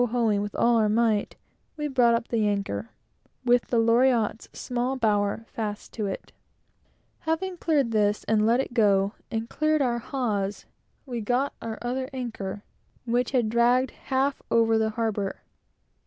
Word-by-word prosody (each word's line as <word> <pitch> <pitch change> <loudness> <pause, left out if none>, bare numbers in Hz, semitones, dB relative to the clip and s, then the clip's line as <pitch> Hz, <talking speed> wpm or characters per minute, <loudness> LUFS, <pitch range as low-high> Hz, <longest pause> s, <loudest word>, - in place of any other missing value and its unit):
ing 230 -4 +1
with 205 0 -5
all 235 0 +3
our 215 -2 +3
might, 220 -1 +1 0.4
we 300 0 -2
brought 245 -4 +4
up 230 +1 -4
an 225 -2 +2
anchor, 195 - -1 0.6
with 245 0 +3
the 240 - 0
Loriotte's 230 -1 +2
small 250 +2 -2
bower 210 -2 +1
fast 210 -2 -5
to 215 -3 -2
it, 195 - -6 0.9
Having 350 +3 -2
cleared 290 -8 +1
this 210 -1 +1
and 215 -1 +2
let 230 +3 +3
it 265 - -2
go, 200 -3 +3 0.2
and 225 -1 -3
cleared 310 +4 +1
our 240 -2 0
hawse, 210 -6 -2 0.4
we 250 -3 -5
soon 215 - -6
got 250 +5 +1
our 225 -1 -5
other 260 +2 -2
anchor, 210 -6 -5 0.4
which 245 +1 +1
had 245 -5 +1
dragged 240 +3 +3
half 270 +1 -1
over 225 -1 +3
the 220 0 +1
harbor. 215 -3 -2
230 Hz, 155 wpm, -26 LUFS, 210-250 Hz, 0.9 s, brought